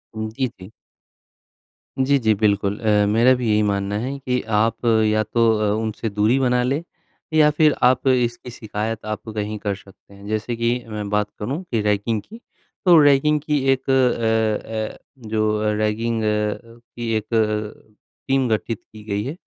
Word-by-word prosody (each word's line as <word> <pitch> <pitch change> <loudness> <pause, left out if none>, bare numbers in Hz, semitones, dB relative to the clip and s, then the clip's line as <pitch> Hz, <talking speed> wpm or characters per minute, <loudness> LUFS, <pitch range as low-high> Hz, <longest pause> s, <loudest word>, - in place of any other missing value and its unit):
उम, 110 0 -3
जी, 130 +4 -2
जी। 95 +3 -12 1.3
जी 140 +2 +3
जी, 110 -3 +3
बिल्कुल। 100 -1 +1
अ, 105 -2 +3
मेरा 115 +5 +4
भी 125 -2 -3
यही 105 0 +3
मानना 100 0 -1
है 135 +4 -3
कि 125 -2 -1 0.2
आप 115 +2 0 0.2
या 110 0 +2
तो 110 +2 -1 0.2
अ, 105 -1 +1
उनसे 110 0 -3
दूरी 105 +5 +2
बना 125 -2 +2
लें 140 +6 -1 0.5
या 155 -1 +5
फिर 150 0 +3
आप 130 +2 +3
इसकी 125 -1 +1
शिकायत 110 -1 -5
आप 110 +1 -5
कहीं 105 0 -3
कर 100 -1 -2
सकते 100 0 -18
हैं। 100 0 -14
जैसे 110 +3 -2
कि, 120 +1 -1
मैं 105 -2 -5
बात 105 0 0
करूँ 135 - -3
कि 115 -3 +1
रैगिंग 105 +1 0
की, 225 - -13 0.5
तो 175 -2 +7
रैगिंग 145 +1 +4
की, 150 -1 0
एक 135 0 -6
अ 115 -1 0
अ, - - -9
जो 110 -1 +1
अ, 105 0 +1
रैगिंग 110 +2 -1
अ, 105 +2 -2 0.2
की 120 -1 -3
एक 110 +2 -7
अ, 105 -1 -1 0.3
टीम 135 -1 +2
गठित 110 0 -1
की 110 -1 -12
गई 105 -1 -2
है 135 +6 -4
110 Hz, 175 wpm, -21 LUFS, 105-125 Hz, 1.3 s, तो